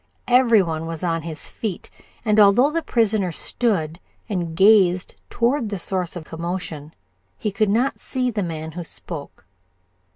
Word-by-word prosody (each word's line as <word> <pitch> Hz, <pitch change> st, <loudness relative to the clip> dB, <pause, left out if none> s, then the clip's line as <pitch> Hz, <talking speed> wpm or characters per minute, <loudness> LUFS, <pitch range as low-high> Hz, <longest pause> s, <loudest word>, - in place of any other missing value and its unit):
Every 240 Hz, -4 st, +5 dB
one 165 Hz, -1 st, -3 dB
was 165 Hz, 0 st, -5 dB
on 165 Hz, -2 st, 0 dB
his 160 Hz, -1 st, -5 dB
feet, 210 Hz, -6 st, -5 dB, 0.3 s
and 215 Hz, -1 st, +3 dB
although 210 Hz, +8 st, +6 dB
the 330 Hz, +1 st, -1 dB
prisoner 215 Hz, -, +1 dB
stood 170 Hz, -4 st, 0 dB, 0.3 s
and 175 Hz, -6 st, -3 dB
gazed 190 Hz, -3 st, +4 dB, 0.2 s
toward 235 Hz, 0 st, 0 dB
the 205 Hz, -, -3 dB
source 180 Hz, -1 st, -2 dB
of 175 Hz, -, -6 dB
commotion 165 Hz, -2 st, -6 dB, 0.4 s
he 210 Hz, -, -2 dB
could 200 Hz, +1 st, +1 dB
not 240 Hz, +6 st, +1 dB
see 255 Hz, -2 st, -2 dB
the 210 Hz, -2 st, -2 dB
man 160 Hz, -3 st, -4 dB
who 175 Hz, +2 st, -6 dB
spoke. 160 Hz, -, -8 dB
190 Hz, 155 wpm, -22 LUFS, 165-220 Hz, 0.4 s, although